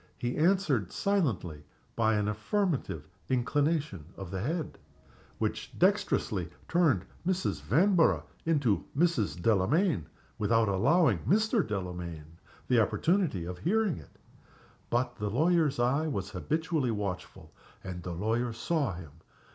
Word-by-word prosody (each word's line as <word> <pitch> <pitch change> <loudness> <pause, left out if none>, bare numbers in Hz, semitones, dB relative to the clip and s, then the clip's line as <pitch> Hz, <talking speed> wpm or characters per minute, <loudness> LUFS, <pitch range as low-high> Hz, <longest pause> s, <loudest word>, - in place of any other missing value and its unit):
He 120 +1 -2
answered 155 - +2
silently 110 - -1 0.3
by 110 -1 +2
an 105 -1 0
affirmative 110 - -1 0.2
inclination 140 - 0
of 95 -3 -7
the 95 -1 -3
head, 160 - -3 0.6
which - - -3
dextrously 85 -3 +1 0.2
turned 150 - +2 0.2
Mrs. 185 +1 -1
Vanborough 180 0 +3 0.2
into 145 -10 +2
to - - -13
Mrs. 160 - +1
Delamayn 110 - +2 0.3
without 115 +1 +3
allowing 140 - +3
Mr. 215 +4 +2
Delamayn 90 -6 -6 0.3
the 125 -2 +4
opportunity 160 - +1
of 90 0 -6
hearing 205 - +1
it. 75 - -16 0.7
But 120 0 0
the 105 0 -2
lawyer's 155 - +2
eye 135 +6 +2
was 100 -10 -3
habitually 155 - -1
watchful, 100 -5 -5 0.3
and 90 -2 -6
the 90 0 -5
lawyer 115 +5 0
saw 135 - -1
him. 80 -4 -10
120 Hz, 125 wpm, -30 LUFS, -, 0.7 s, the